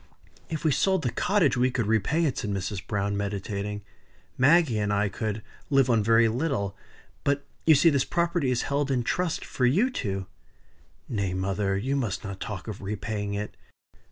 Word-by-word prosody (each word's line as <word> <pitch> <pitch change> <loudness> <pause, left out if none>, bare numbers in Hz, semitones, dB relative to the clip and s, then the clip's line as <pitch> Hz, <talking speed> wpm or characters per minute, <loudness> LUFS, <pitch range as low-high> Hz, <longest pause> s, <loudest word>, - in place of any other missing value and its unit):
"If 160 -2 -4
we 155 - +4
sold 190 +7 +2
the 125 - 0
cottage 190 - +2
we 125 +1 +3
could 120 -3 -1
repay 110 - +2
it," 140 - 0
said 105 - -3
Mrs. 100 0 -3
Browne, 100 0 -1
meditating. 100 0 -3 0.5
"Maggie 140 -4 +4
and 105 0 0
I 100 0 +1
could 105 +2 -3 0.3
live 135 -3 +4
on 115 -3 +3
very 115 +1 +5
little. 115 -5 -1 0.5
But 140 0 0 0.2
you 160 - +8
see 160 +4 +5
this 140 -2 +2
property 170 -4 0
is 125 -1 +1
held 140 0 0
in 125 -3 +1
trust 170 +5 -1
for 125 - +1
you 200 - +3
two." 95 - -3 0.8
"Nay, 100 -5 -2
mother; 95 +1 0
you 130 +8 -1
must 120 -9 -2
not 100 -2 -6
talk 105 -3 -6
of 105 -3 -6
repaying 105 0 -3
it. 105 +1 -4
115 Hz, 180 wpm, -27 LUFS, 100-140 Hz, 0.8 s, you